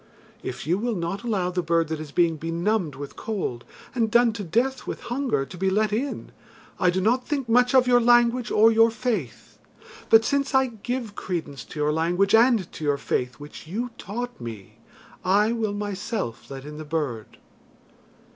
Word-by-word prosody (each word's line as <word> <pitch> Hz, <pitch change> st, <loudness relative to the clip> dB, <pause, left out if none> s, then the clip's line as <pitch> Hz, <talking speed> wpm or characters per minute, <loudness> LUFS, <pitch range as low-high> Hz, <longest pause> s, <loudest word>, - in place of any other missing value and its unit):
If -, -, -6 dB
you 175 Hz, +5 st, +1 dB
will 235 Hz, 0 st, -1 dB
not 175 Hz, +2 st, -3 dB
allow 200 Hz, -7 st, -1 dB
the 180 Hz, 0 st, -1 dB
bird 165 Hz, -1 st, +1 dB
that 160 Hz, -1 st, -3 dB
is 155 Hz, -2 st, -8 dB
being 170 Hz, 0 st, +2 dB
benumbed 170 Hz, +1 st, -1 dB
with 140 Hz, 0 st, -8 dB
cold, 190 Hz, -, -4 dB, 0.3 s
and 230 Hz, -3 st, +1 dB
done 235 Hz, 0 st, +4 dB
to 210 Hz, -2 st, -5 dB
death 240 Hz, +10 st, 0 dB
with -, -, -4 dB
hunger, 245 Hz, -, -1 dB
to 180 Hz, -, -11 dB
be 190 Hz, 0 st, +2 dB
let 210 Hz, +2 st, +1 dB
in, 265 Hz, +6 st, -3 dB, 0.5 s
I 180 Hz, -, +4 dB
do 180 Hz, +2 st, 0 dB
not 240 Hz, +6 st, +1 dB
think 275 Hz, -4 st, -2 dB
much 245 Hz, +3 st, +4 dB
of 255 Hz, -1 st, +6 dB
your 245 Hz, -1 st, +5 dB
language 240 Hz, 0 st, +4 dB
or 225 Hz, +2 st, +5 dB
your 225 Hz, +1 st, +5 dB
faith. 220 Hz, -, -4 dB, 0.5 s
But 225 Hz, 0 st, +6 dB
since 280 Hz, -1 st, 0 dB
I 265 Hz, 0 st, +5 dB, 0.2 s
give 245 Hz, -3 st, -3 dB
credence 160 Hz, -10 st, -4 dB
to 155 Hz, -, -9 dB
your 150 Hz, 0 st, +1 dB
language 175 Hz, +5 st, +1 dB
and 225 Hz, -4 st, +4 dB
to -, -, -8 dB
your 145 Hz, -1 st, +1 dB
faith, 125 Hz, -2 st, -2 dB
which 145 Hz, +3 st, -11 dB
you 235 Hz, +8 st, -3 dB
taught 245 Hz, -, -5 dB
me, 110 Hz, -5 st, -9 dB, 0.4 s
I 205 Hz, +4 st, +3 dB
will 225 Hz, -3 st, -1 dB
myself 205 Hz, -, -4 dB
let 135 Hz, 0 st, -8 dB
in 150 Hz, +1 st, -8 dB
the -, -, -5 dB
bird." 145 Hz, -8 st, -4 dB
205 Hz, 185 wpm, -25 LUFS, 160-235 Hz, 0.5 s, of